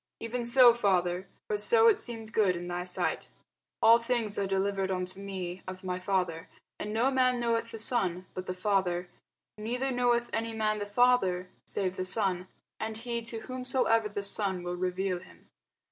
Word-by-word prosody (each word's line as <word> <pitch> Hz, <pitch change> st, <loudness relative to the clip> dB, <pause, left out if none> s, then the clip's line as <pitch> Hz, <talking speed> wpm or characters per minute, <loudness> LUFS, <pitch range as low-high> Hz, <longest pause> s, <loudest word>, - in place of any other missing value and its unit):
Even 235 Hz, +1 st, -4 dB
so, 245 Hz, -1 st, +8 dB
Father: 185 Hz, -4 st, +1 dB, 0.2 s
for 210 Hz, -, -1 dB
so 455 Hz, -, +6 dB
it 435 Hz, -2 st, +5 dB
seemed 225 Hz, -, -6 dB
good 195 Hz, -4 st, +3 dB
in 175 Hz, 0 st, -6 dB
thy 175 Hz, 0 st, -3 dB
sight. 180 Hz, -, -1 dB, 0.5 s
All 230 Hz, +1 st, +8 dB
things 230 Hz, -3 st, -1 dB
are 200 Hz, -, 0 dB
delivered 195 Hz, 0 st, 0 dB
unto 185 Hz, 0 st, -1 dB
me 190 Hz, -2 st, -5 dB
of 185 Hz, +1 st, -7 dB
my 180 Hz, -1 st, -3 dB
Father: 185 Hz, -3 st, -1 dB, 0.3 s
and 210 Hz, -, -4 dB
no 235 Hz, +5 st, +2 dB
man 255 Hz, -2 st, +2 dB
knoweth 230 Hz, -1 st, 0 dB
the -, -, -7 dB
Son, 190 Hz, -6 st, 0 dB
but 185 Hz, 0 st, -6 dB
the 185 Hz, -, -2 dB
Father; 185 Hz, -2 st, 0 dB, 0.5 s
neither 250 Hz, +5 st, -2 dB
knoweth 240 Hz, -1 st, +1 dB
any 225 Hz, 0 st, -2 dB
man 215 Hz, -1 st, 0 dB
the 205 Hz, -, -4 dB
Father, 205 Hz, -5 st, +2 dB, 0.2 s
save 185 Hz, -2 st, -2 dB
the 185 Hz, -, -1 dB
Son, 185 Hz, -2 st, -1 dB, 0.3 s
and 220 Hz, 0 st, -3 dB
he 235 Hz, 0 st, -3 dB
to 230 Hz, -1 st, -7 dB
whomsoever 255 Hz, -3 st, +1 dB
the 200 Hz, 0 st, -4 dB
Son 195 Hz, -2 st, -1 dB
will 175 Hz, 0 st, -3 dB
reveal 185 Hz, +1 st, -1 dB
him. 180 Hz, -, -18 dB
205 Hz, 175 wpm, -29 LUFS, 185-235 Hz, 0.5 s, so